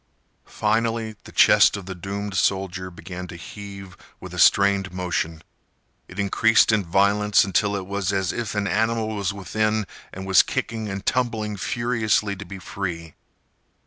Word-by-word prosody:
Finally, 115 0 -1
the - - -11
chest - - +5
of 100 - -8
the 95 - -5
doomed 100 +3 -5
soldier 95 -1 0
began 90 +1 -8
to 85 - -9
heave 100 +1 -9 0.2
with - - -10
a - - -5
strained 100 -1 +4
motion. 90 -3 -3 0.6
It 90 - -13
increased 110 +3 +4
in 110 -2 +2
violence 100 +4 +3
until 100 +1 +1
it 95 -2 -4
was 100 0 -2
as 95 -2 0
if 115 -5 -4
an 105 -1 0
animal 110 +2 0
was 100 -3 -2
within 110 +2 -1 0.3
and 95 +1 -7
was 95 0 +6
kicking 110 -2 -3
and 95 0 -5
tumbling 110 -4 -1
furiously 110 -1 0
to 100 +1 -9
be 95 - -8
free. 85 -4 -5
100 Hz, 155 wpm, -23 LUFS, 95-110 Hz, 0.6 s, was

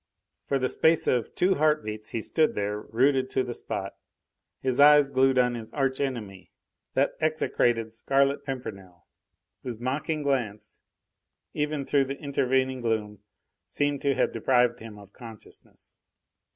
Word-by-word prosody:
For 140 - +1
the 130 -1 0
space 160 +4 +2
of 120 -3 0
two 185 +2 +3
heart 155 -3 +1
beats 105 0 -6
he 115 - -3
stood 155 +7 +2
there, 105 0 -2
rooted 130 +4 +1
to 130 - 0
the 120 - -5
spot, 95 -4 -5 0.7
his 130 0 -1
eyes 145 -1 +7
glued 130 0 +3
on 125 -1 +3
his 115 -2 -7
arch 135 -2 -1
enemy, 110 -9 -5 0.5
that 140 +2 +2
execrated 120 -7 +1
Scarlet 135 +4 +1
Pimpernel, 95 - -8 0.6
whose 120 -4 -6
mocking 150 +5 -2
glance, 125 -7 -3 0.7
even 150 -2 -2
through 140 -1 +2
the 135 +1 -5
intervening 130 -3 0
gloom, 110 -3 -2 0.5
seemed 145 -1 -1
to 140 -1 +1
have - - 0
deprived 120 +1 +2
him 110 -2 -10
of 100 -1 -15
consciousness. 115 -4 -13
130 Hz, 145 wpm, -26 LUFS, 115-140 Hz, 0.7 s, eyes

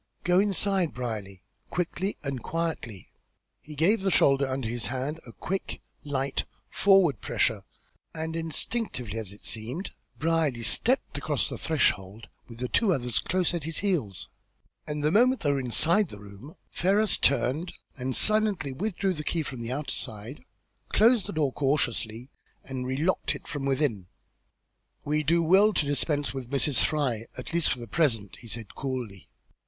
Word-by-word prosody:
"Go 180 +1 +4
inside, 195 -3 +1
Brierly, 105 -7 -5 0.3
quickly 180 +3 -2
and 135 -3 -3
quietly." 160 - -4 0.5
He 150 - -10
gave 190 +9 +3
the 195 - +1
shoulder 140 -5 +4
under 130 -3 -2
his 115 -2 -3
hand 135 +6 -3
a - - -9
quick, 190 +10 -4 0.2
light, 140 -1 -2 0.3
forward 190 - +4
pressure, 110 -3 0 0.5
and 160 0 -4
instinctively, 160 - -2
as 105 -4 -5
it 100 - -12
seemed, 120 - -4 0.3
Brierly 155 -7 +1
stepped 255 - +3
across - - 0
the - - -5
threshold 110 - 0 0.2
with 115 - -11
the 125 - +1
other 125 -6 -1
two - - +2
close 180 -1 +1
at 170 -4 -3
his 165 -1 -3
heels, 140 - -1 0.6
and, 150 0 -3
the 150 - +3
moment 250 +6 +4
they 145 - +2
were 140 - +1
inside 160 - +3
the 105 - -9
room, 100 +9 -12 0.2
Ferrars 200 +3 +3
turned 140 +6 +1 0.2
and 130 0 -3
silently 215 -9 +3
withdrew 195 +5 -1
the 150 -3 -5
key 165 +1 -1
from 130 -4 -7
the 115 +1 -4
outer 145 +3 -2
side, 110 +6 -4 0.5
closed 225 -2 +4
the - - -5
door 150 -4 +1
cautiously, 125 -3 0 0.3
and 130 -1 -5
relocked 150 +8 0
it - - -11
from 140 -1 -4
within. 130 - 0 1.0
"We 150 +1 +1
will 155 - 0
do 170 +3 +3
well 195 +6 +5
to 150 - +1
dispense 145 0 0
with 130 -3 -6
Mrs. 140 0 +2
Fry, 125 -7 0
at 125 - -6
least 170 -1 +3
for - - 0
the 120 - -7
present," 115 - 0
he 120 - -12
said, 115 -1 -7
coolly. 125 -8 -5
145 Hz, 165 wpm, -27 LUFS, 120-170 Hz, 1.0 s, well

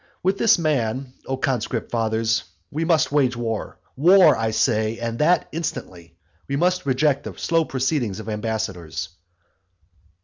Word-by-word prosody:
With 190 +2 +1
this 230 - +5
man, 135 -5 -1
O 135 - -2
conscript 125 -3 -2
fathers, 115 0 0 0.3
we 155 +3 -2
must 165 -4 +2
wage 130 -4 +2
war, 115 -2 -4 0.2
war, 170 +2 +6
I 115 -1 -1
say, 110 0 +1
and 115 0 -4
that 170 +4 +3
instantly. 90 - -6 0.3
We 140 - -2
must 180 +1 +1
reject 140 +1 +2
the - - -7
slow 165 -1 +1
proceedings 130 -7 -1
of 110 - -9
ambassadors. 105 -6 -3
130 Hz, 140 wpm, -22 LUFS, 110-155 Hz, 0.3 s, war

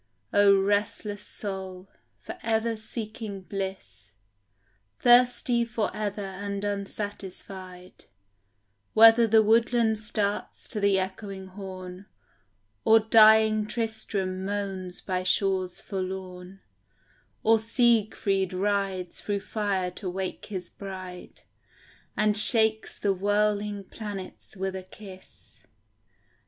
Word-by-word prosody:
O 200 -1 +6
restless 205 +1 0
soul, 190 -3 -6 0.3
for - - -8
ever 225 0 0
seeking 215 -2 -6
bliss, 185 - -6 0.8
Thirsty 245 0 +4
for 225 -3 -2
ever 205 -1 -3
and 200 +1 -5
unsatisfied, 195 -2 -6 0.9
Whether 225 +1 +8
the 220 0 +5
woodland 225 0 +3
starts 210 -1 -2
to 215 - -3
the 200 -1 +3
echoing 190 0 -5
horn, 185 0 -9 0.8
Or 225 0 +6
dying 220 -1 +5
Tristram 210 -5 -3
moans 195 -2 -4
by 185 -1 -2
shores 185 -1 0
forlorn, 185 -1 -6 0.8
Or 225 0 +5
Siegfried 220 -5 +1
rides 195 -2 -1
through 200 -1 -2
fire 195 -3 -2
to 185 +1 -6
wake 185 +1 -5
his 185 -4 -6
bride, 185 -2 -9 0.8
And 210 0 +2
shakes 220 0 +2
the 200 -1 +1
whirling 205 +1 0
planets 200 -1 -8
with 190 0 -3
a 190 - -4
kiss. 185 - -14
200 Hz, 100 wpm, -27 LUFS, 190-215 Hz, 0.9 s, Whether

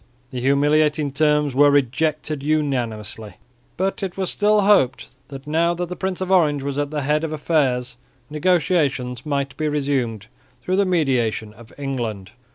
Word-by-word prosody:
The 125 - -4
humiliating 145 +2 +2
terms 150 0 +2
were 145 +2 +5
rejected 145 +2 0
unanimously, 120 -8 -2 0.4
but 195 +3 -1
it 190 -2 -4
was 190 -2 -1
still 210 0 +3
hoped 195 -11 +3 0.2
that 135 -1 -10
now 165 +3 +1
that 175 0 -4
the 180 - -5
Prince 190 0 -3
of 185 0 -2
Orange 150 -7 +3
was 140 0 -3
at 145 -1 -1
the 150 -1 -3
head 150 +3 +1
of 160 - -2
affairs 135 -6 0 0.3
negotiations 150 -5 0
might 140 -2 -2
be 155 - -1
resumed 135 -8 -1 0.3
through 185 +10 -1
the 200 - +3
mediation 125 - 0
of 110 +1 -16
England. 115 -8 -4
145 Hz, 160 wpm, -21 LUFS, 130-160 Hz, 0.4 s, were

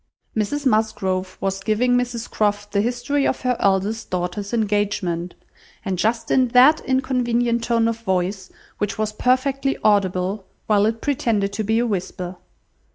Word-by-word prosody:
Mrs 280 +7 -1
Musgrove 200 -5 0
was 195 0 -2
giving 240 +4 +2
Mrs 245 -2 -1
Croft 205 -1 -1
the 200 0 +2
history 245 +5 0
of - - -1
her 250 -1 +1
eldest 200 +3 0
daughter's 180 +3 -3
engagement, 205 -6 -1 0.5
and 185 -2 -2
just 225 +4 0
in 255 -1 +4
that 295 +5 +7
inconvenient 245 -3 0
tone 230 -1 +2
of 230 0 -2
voice 190 -2 -2 0.3
which 205 - -2
was 215 0 -1
perfectly 270 +4 +1
audible 195 -1 +1 0.2
while 210 -1 +3
it 225 0 -2
pretended 220 -8 0
to 215 +2 -2
be 220 +2 +1
a 240 - +2
whisper. 185 -3 -4
215 Hz, 150 wpm, -22 LUFS, 195-245 Hz, 0.5 s, that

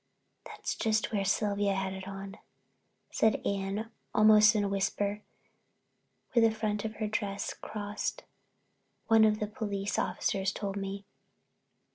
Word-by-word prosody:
"That's - - -4
just 220 -2 0
where 205 -3 0
Sylvia 200 0 +1
had 190 0 -2
it 190 0 -7
on," 195 0 -7 0.7
said 220 -1 +3
Anne 200 +3 -2 0.2
almost 215 0 +7
in 210 - +2
a - - +1
whisper, 200 +1 -1 1.1
"where 230 -2 +5
the - - -2
front 210 -2 -1
of 220 0 -4
her 215 - -2
dress 205 -1 -2
crossed. 205 -1 -4 0.9
One 225 -1 +7
of 215 -1 +4
the 210 - 0
police 205 -2 -3
officers 190 -1 0
told 200 -2 -4
me." 195 0 -4
205 Hz, 135 wpm, -30 LUFS, 195-215 Hz, 1.1 s, almost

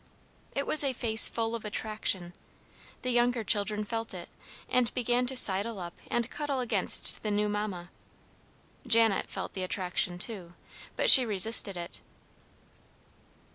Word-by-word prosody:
It 280 - -2
was 310 - +5
a 275 -2 -2
face 225 -2 +3
full 225 0 -4
of 230 - -6
attraction; 210 -4 -4 0.7
the 255 - -3
younger 240 -1 0
children 210 0 -1
felt 225 -2 -6
it, 175 -1 -10 0.4
and 250 -2 -1
began 245 0 -1
to 265 0 -3
sidle 205 0 +2
up 175 -1 -8 0.2
and 240 -1 -2
cuddle 290 -3 -4
against 245 -2 +2
the 215 - -5
new 210 0 -1
mamma. 205 -4 -6 1.0
Janet 225 -3 +3
felt - - -7
the 190 - -7
attraction, 180 -1 -2
too, 180 -3 -7 0.4
but - - +6
she 260 - +11
resisted 205 -2 +2
it. 170 0 -6
220 Hz, 140 wpm, -27 LUFS, 190-240 Hz, 1.0 s, she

